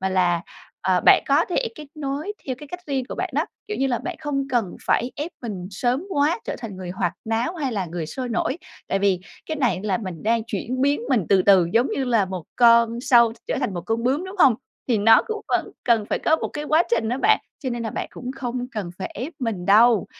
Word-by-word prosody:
mà 190 Hz, -, 0 dB
là, 180 Hz, -2 st, +2 dB, 0.4 s
ờ, -, -, +2 dB
bạn -, -, +7 dB
có -, -, +4 dB
thể 460 Hz, +6 st, -1 dB
kết 300 Hz, -, -10 dB
nối 295 Hz, +5 st, -3 dB
theo 260 Hz, -, -1 dB
cái 295 Hz, -1 st, -11 dB
cách 360 Hz, +3 st, -7 dB
riêng 270 Hz, -3 st, -1 dB
của -, -, -5 dB
bạn -, -, -2 dB
đó, -, -, +2 dB, 0.2 s
kiểu 425 Hz, -, -3 dB
như 270 Hz, -, +1 dB
là, 245 Hz, -3 st, 0 dB
bạn 330 Hz, +8 st, -5 dB
không 275 Hz, -2 st, -2 dB
cần 235 Hz, -8 st, -1 dB
phải 245 Hz, -, +2 dB
ép 305 Hz, +4 st, -3 dB
mình 195 Hz, -6 st, -5 dB
sớm 245 Hz, -, -1 dB
quá, 300 Hz, +2 st, +2 dB
trở -, -, -4 dB
thành 225 Hz, -5 st, -7 dB
người 185 Hz, -1 st, -6 dB
hoạt 175 Hz, -1 st, -1 dB
náo, 225 Hz, +9 st, -1 dB
hay 275 Hz, -5 st, -2 dB
là 195 Hz, -4 st, -2 dB
người 165 Hz, -1 st, -4 dB
sôi 255 Hz, +8 st, -5 dB
nổi. 235 Hz, +7 st, -1 dB, 0.3 s
Tại 195 Hz, -, +1 dB
vì 195 Hz, -2 st, +2 dB, 0.3 s
cái 315 Hz, -, -3 dB
này 245 Hz, -9 st, +1 dB
là 200 Hz, -3 st, 0 dB
mình 185 Hz, -7 st, -6 dB
đang 225 Hz, +1 st, +2 dB
chuyển 255 Hz, +2 st, -3 dB
biến 285 Hz, +2 st, +2 dB
mình 240 Hz, -10 st, +2 dB
từ 190 Hz, -2 st, +5 dB
từ 190 Hz, -4 st, +6 dB
giống 240 Hz, +4 st, +3 dB
như 270 Hz, -, -1 dB
là 230 Hz, -5 st, +3 dB
1 185 Hz, -3 st, -6 dB
con 235 Hz, -1 st, +5 dB
sâu 235 Hz, -3 st, +5 dB
trở -, -, -1 dB
thành 195 Hz, -, -1 dB
1 175 Hz, -, -4 dB
con 225 Hz, +1 st, 0 dB
bướm, 275 Hz, +8 st, +1 dB
đúng 380 Hz, +2 st, -8 dB
hông? 265 Hz, -8 st, +6 dB, 0.3 s
Thì 235 Hz, -4 st, +3 dB
nó 225 Hz, +2 st, +6 dB
cũng 440 Hz, -2 st, -3 dB
vẫn -, -, 0 dB
cần 230 Hz, -3 st, +3 dB
phải -, -, -1 dB
có 315 Hz, -, +3 dB
1 -, -, -3 dB
cái 295 Hz, -, -5 dB
quá 310 Hz, +2 st, +4 dB
trình 225 Hz, -1 st, +1 dB
á 250 Hz, +3 st, -1 dB
bạn, 430 Hz, +6 st, +4 dB, 0.2 s
cho 260 Hz, -, -4 dB
nên 240 Hz, -1 st, -3 dB
là 225 Hz, -, -3 dB
bạn -, -, -4 dB
cũng 250 Hz, +1 st, -7 dB
không 250 Hz, -1 st, -3 dB
cần 205 Hz, -6 st, -4 dB
phải 190 Hz, -, -4 dB
ép 255 Hz, -, -5 dB
mình 220 Hz, -8 st, -3 dB
đâu. 220 Hz, +1 st, +5 dB
235 Hz, 255 wpm, -23 LUFS, 200-275 Hz, 0.4 s, bạn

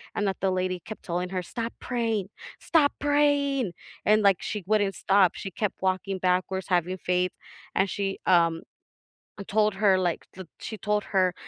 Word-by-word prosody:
and 205 Hz, -, 0 dB
that 190 Hz, -, -1 dB
the 190 Hz, 0 st, +2 dB
lady 185 Hz, 0 st, -1 dB
kept 215 Hz, -, -8 dB
telling 180 Hz, +1 st, -2 dB
her, 185 Hz, -1 st, -2 dB
"Stop 230 Hz, +5 st, -5 dB
praying. 225 Hz, -6 st, -1 dB, 0.3 s
Stop 305 Hz, -4 st, +3 dB
praying!" 285 Hz, -6 st, +2 dB, 0.3 s
and, 215 Hz, +1 st, +5 dB
like, 195 Hz, -3 st, +4 dB
she 210 Hz, -2 st, -4 dB
wouldn't 205 Hz, -2 st, +2 dB
stop, 195 Hz, -2 st, +3 dB
she 195 Hz, -, -5 dB
kept 205 Hz, +2 st, -3 dB
walking 190 Hz, 0 st, -1 dB
backwards, 185 Hz, +1 st, 0 dB
having 180 Hz, 0 st, +1 dB
faith, 180 Hz, 0 st, 0 dB, 0.4 s
and 190 Hz, +1 st, +2 dB
she, 195 Hz, 0 st, -2 dB
um, 165 Hz, -2 st, +4 dB, 0.8 s
uh, -, -, -4 dB
told 215 Hz, 0 st, +2 dB
her, 195 Hz, -1 st, +4 dB
like, 180 Hz, -2 st, -1 dB
that 185 Hz, -1 st, -9 dB
she 220 Hz, -, -6 dB
told 210 Hz, 0 st, 0 dB
her, 185 Hz, -2 st, +3 dB
195 Hz, 175 wpm, -27 LUFS, 185-215 Hz, 0.8 s, and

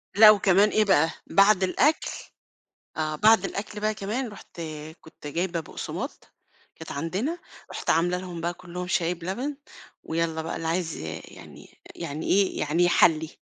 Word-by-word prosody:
لأ 215 Hz, +1 st, +10 dB
وكمان 200 Hz, 0 st, +4 dB
إيه 215 Hz, 0 st, +2 dB
بقى، 165 Hz, -5 st, +4 dB, 0.2 s
بعد 200 Hz, -1 st, +5 dB
الأكل 280 Hz, +12 st, +2 dB, 0.9 s
آه. 155 Hz, -1 st, -1 dB
بعد 215 Hz, +3 st, +5 dB
الأكل 210 Hz, +2 st, -5 dB
بقى 215 Hz, +1 st, 0 dB
كمان 215 Hz, +5 st, -3 dB
رُحت 195 Hz, -4 st, -11 dB, 0.4 s
كنت 160 Hz, -2 st, -12 dB
جايبة 170 Hz, +3 st, -2 dB
بُقسماط 160 Hz, -, -7 dB, 0.4 s
كانت 160 Hz, -, -9 dB
عندنا، 195 Hz, -, -2 dB, 0.3 s
رُحت -, -, -5 dB
عاملة 175 Hz, +2 st, +2 dB
لهم 180 Hz, -2 st, -7 dB
بقى 170 Hz, +1 st, -1 dB
كُلّهم 180 Hz, 0 st, -7 dB
شاي 175 Hz, -1 st, +1 dB
بلبن، 195 Hz, -, -4 dB, 0.5 s
ويالّا 160 Hz, -1 st, -1 dB
بقى 165 Hz, -, -4 dB
اللي 165 Hz, 0 st, -4 dB
عايز 165 Hz, -1 st, -1 dB
ي 80 Hz, +1 st, -6 dB
يعني -, -, -14 dB, 0.2 s
يعني 150 Hz, +3 st, -5 dB
إيه، 195 Hz, -1 st, +2 dB
يعني 150 Hz, +4 st, +1 dB
يحلّي. 160 Hz, -2 st, +4 dB
180 Hz, 150 wpm, -26 LUFS, 165-205 Hz, 0.9 s, لأ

